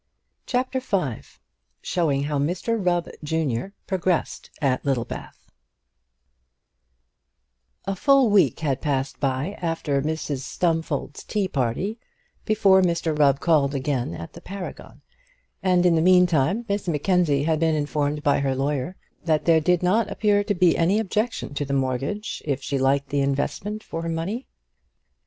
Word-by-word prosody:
CHAPTER 255 +1 0
V 185 - -1 0.6
Showing 150 -6 0
How 145 0 -1
Mr 185 +9 -1
Rubb, 175 -1 +1 0.2
Junior, 160 - -2
Progressed 185 -3 -1
at 135 -4 0
Littlebath 135 -4 -4 2.3
A 195 - -2
full 270 +2 +4
week 200 -5 +3
had 140 -4 -1
passed 140 -2 -2
by 135 +7 -1
after 165 -5 -1
Mrs 150 -2 -2
Stumfold's 160 0 -2
tea 205 -3 -1
party 155 - -2 0.5
before 205 -3 +4
Mr 170 -3 0
Rubb 140 -2 +4
called 145 -4 +2
again 130 - -1
at 85 0 -8
the 170 - -11
Paragon; 195 0 -8 0.6
and 180 -2 +3
in 175 - +5
the 160 - +3
meantime 180 - +3
Miss 200 -1 -2
Mackenzie 160 -2 +2
had 160 0 +1
been 160 -1 +2
informed 150 0 -1
by 145 -2 +3
her 135 -1 0
lawyer 140 +5 -2 0.3
that 155 -2 +1
there 165 -2 +5
did 180 +2 +2
not 210 +4 +2
appear 205 0 +2
to 205 - 0
be 180 -1 +4
any 175 +5 +2
objection 220 -4 -2
to 145 - -2
the 140 0 -3
mortgage, 135 - -2
if 140 -3 -2
she 140 +1 -1
liked 135 +1 +1
the 140 -1 0
investment 165 +10 -2
for 165 - -5
her 165 - -3
money. 180 +10 -3
165 Hz, 145 wpm, -24 LUFS, 140-190 Hz, 2.3 s, in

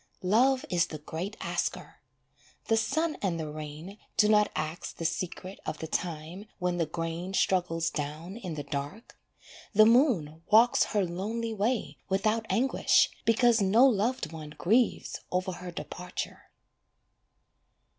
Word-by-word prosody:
Love 255 +8 +3
is 175 -1 +2
the 155 - -6
great 165 +7 -6
Asker, - - -3 0.7
The 225 - +5
sun 305 +8 0
and 180 -4 -1
the 155 - -3
rain 155 +6 -8 0.2
do 210 - +5
not 210 -1 +4
ask 155 +2 -4
the 165 - -4
secret 180 +3 -3
Of 155 - -4
the 160 - -5
time 165 +4 -4
when 180 -1 -1
the 165 -2 0
grain 165 +4 -4
struggles 165 -4 +1
down 155 +5 -5
in 185 -9 -6
the 145 - -4
dark. 145 - -6 0.6
The 215 +1 +8
moon 220 - +3
walks 230 +3 +5
her 205 -3 0
lonely 220 +6 -3
way 220 +3 -1
without 215 +4 +1
anguish, 240 +8 +3 0.2
Because 230 0 +4
no 210 +7 +5
loved 230 - +1
one 155 -2 -9
grieves 225 +6 +1
over 185 +1 0
her 180 0 -7
departure. 180 +1 -6
185 Hz, 140 wpm, -29 LUFS, 165-220 Hz, 0.7 s, The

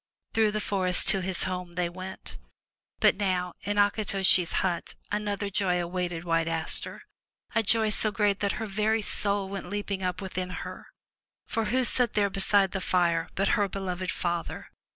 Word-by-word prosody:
Through 220 -1 +3
the 215 0 -2
forest 185 -3 +1
to 195 - +3
his 185 -1 -1
home 180 -2 -4
they 175 -1 0
went. 185 - -8 0.6
But - - +4
now 180 -3 -1
in 205 +1 -2
Akitoshi's 195 -4 +4
hut 175 -2 -2 0.2
another 205 -1 -2
joy 185 -3 +1
awaited 175 -1 -3
White 165 -1 +1
Aster, 165 -1 -1 0.2
— - - -32
a 225 - +3
joy 220 0 +2
so 215 - +1
great 205 -1 +1
that 200 -1 0
her 225 - -4
very 215 +2 0
soul 200 -1 -1
went 195 -2 -6
leaping 205 -1 -3
up 180 -1 -2
within 185 -1 -4 0.2
her. - - -9 0.6
For 225 -1 -1
who 255 +5 +1
sat 245 -1 +2
there 200 -2 +2
beside 195 0 +3
the 190 - -3
fire, 170 -3 +1
but 195 0 +1
her 205 -1 +2
beloved 185 -1 -3
father? 175 -1 -3
195 Hz, 170 wpm, -28 LUFS, 180-205 Hz, 0.6 s, But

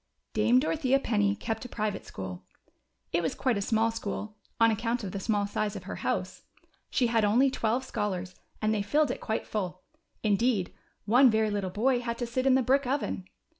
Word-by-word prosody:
D 215 - 0
ame 235 +3 +5
Dorothea 275 -2 +2
penny 205 -5 +1
kept 225 +1 -4
a 250 - -8
private 210 -3 -3
school. 95 -1 -7 0.7
It 170 - +2
was 160 - -1
quite 250 -6 +1
a - - -2
small 225 +2 +2
school, 215 -1 -5 0.2
on 230 0 +6
account 230 +2 -1
of 190 - -4
the 200 - -4
small 205 0 0
size 205 +1 -2
of 195 - -6
her 185 - -6
house. - - -2 0.5
She 255 - +2
had 230 -2 +2
only 245 +6 +4
twelve 240 +2 0
scholars, 190 -6 -3 0.3
and 215 0 +3
they 210 - 0
filled 290 +6 +2
it - - -5
quite 220 - -2
full; 185 -3 -4 0.4
indeed 210 -2 +1 0.3
one 250 +5 +6
very 220 -1 +2
little 200 -2 -1
hoy 250 +4 +3
had 235 -1 -3
to 240 - -2
sit 255 +3 -1
in 260 - +6
the 260 - +3
hrick 270 +2 +2
oven. 260 -8 -1
220 Hz, 205 wpm, -29 LUFS, 205-245 Hz, 0.7 s, on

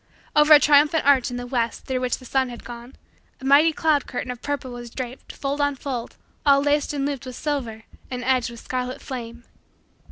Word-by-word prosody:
Over 300 +1 +7
a - - +7
triumphant 295 +1 +4
arch 275 -3 +4
in 245 - -5
the 245 - -5
west, 240 -2 -2
through 260 -1 -1
which 250 -1 0
the 255 - -15
sun 260 0 0
had 240 -1 -9
gone, 240 +2 -10 0.4
a 265 - -9
mighty 290 +4 +6
cloud 310 -2 +1
curtain 250 0 -4
of 245 - -9
purple 285 -3 -3
was 240 -1 -8
draped, 255 +1 -7
fold 280 +1 -3
on 285 -1 +1
fold, 255 -3 -5 0.3
all 280 -1 +5
laced 290 0 +1
and 280 -2 -2
looped 275 -2 -4
with 255 - -7
silver 240 -8 -3 0.3
and 250 -1 -4
edged 255 -1 +1
with 235 -1 -10
scarlet 255 0 -4
flame. 240 -2 -7
260 Hz, 210 wpm, -23 LUFS, 245-285 Hz, 0.4 s, Over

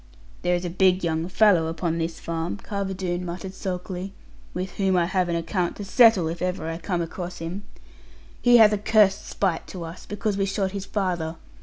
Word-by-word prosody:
'There 180 0 +2
is 175 +1 -3
a - - -2
big 185 0 +3
young 165 0 0
fellow 185 -4 +4
upon 165 0 -2
this 165 0 -3
farm,' 165 +3 -3
Carver 195 -1 -4
Doone 180 -1 -2
muttered 180 +2 -6
sulkily, 185 0 -5 0.4
'with 185 +1 -4
whom 190 -2 +2
I 175 - +3
have 185 0 0
an 170 - 0
account 170 +1 -1
to 205 - -6
settle, 215 -4 +5
if 165 +1 -5
ever 180 -2 -2
I 165 0 -4
come 175 -1 -1
across 175 +2 -6
him. 170 +4 -5 0.8
He 245 0 +7
hath 215 -2 +7
a 210 - 0
cursed 210 -2 +3
spite 185 -5 -1
to 180 -3 -7
us, 165 +2 -9
because 205 0 -2
we 195 - +1
shot 195 -1 -1
his 200 -1 -5
father. 175 -6 -2
185 Hz, 200 wpm, -25 LUFS, 170-195 Hz, 0.8 s, He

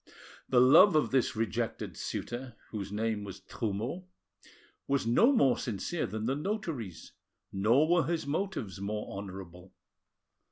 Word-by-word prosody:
The 125 - +5
love 155 +9 +7
of 155 - +2
this 130 -4 +2
rejected 110 -4 -2
suitor, 120 0 -5 0.2
whose 100 -3 -5
name 110 0 -1
was 95 -2 -8
Trumeau, 115 - -4 0.8
was 140 -3 +1
no 170 - +5
more 135 - +3
sincere 125 - -2
than 110 0 -4
the 130 +3 +1
notary's, 150 - -4 0.4
nor 115 +10 +3
were 175 0 +3
his 165 -3 -1
motives 145 - -3
more 105 0 -4
honourable. 95 -2 -9
120 Hz, 130 wpm, -30 LUFS, 100-155 Hz, 0.8 s, love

